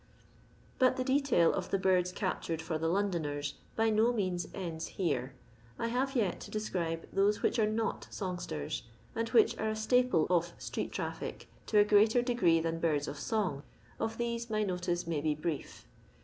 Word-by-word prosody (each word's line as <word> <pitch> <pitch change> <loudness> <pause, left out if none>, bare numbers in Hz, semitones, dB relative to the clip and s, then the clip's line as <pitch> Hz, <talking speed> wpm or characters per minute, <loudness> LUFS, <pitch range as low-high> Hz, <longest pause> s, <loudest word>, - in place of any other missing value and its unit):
But 255 -1 +5
the 255 - 0
detail 265 - +3
of 185 -1 -3
the 195 - +2
birds 185 -1 +2
captured 180 -4 -2
for 160 -1 -3
the 165 - 0
Londoners 165 -6 -1 0.2
by 225 0 +2
no 220 +3 +4
means 185 -6 -1
ends 165 -4 -4
here. 135 -8 -1 0.4
I 230 - -1
have 265 +3 0
yet 205 -8 +1
to - - -9
describe 170 -6 -2
those 205 +2 +2
which - - +2
are 215 -1 +3
not 220 +1 -2
songsters, 175 - -4 0.3
and 230 0 -1
which 225 -2 +5
are 220 - 0
a 215 - -1
staple 220 -5 +3
of 175 -1 +2
street - - -4
traffic - - -5 0.2
to 215 - +2
a 205 - +8
greater 215 +3 +5
degree 235 -10 +3
than 165 0 -2
birds 150 -3 +1
of 140 - -5
song. 185 -7 -1 0.4
Of 225 0 -2
these 235 0 -2
my 215 -1 +1
notice 180 -2 -1
may 165 -3 -1
be 150 0 +1
brief. 155 0 -4
190 Hz, 175 wpm, -32 LUFS, 165-225 Hz, 0.4 s, a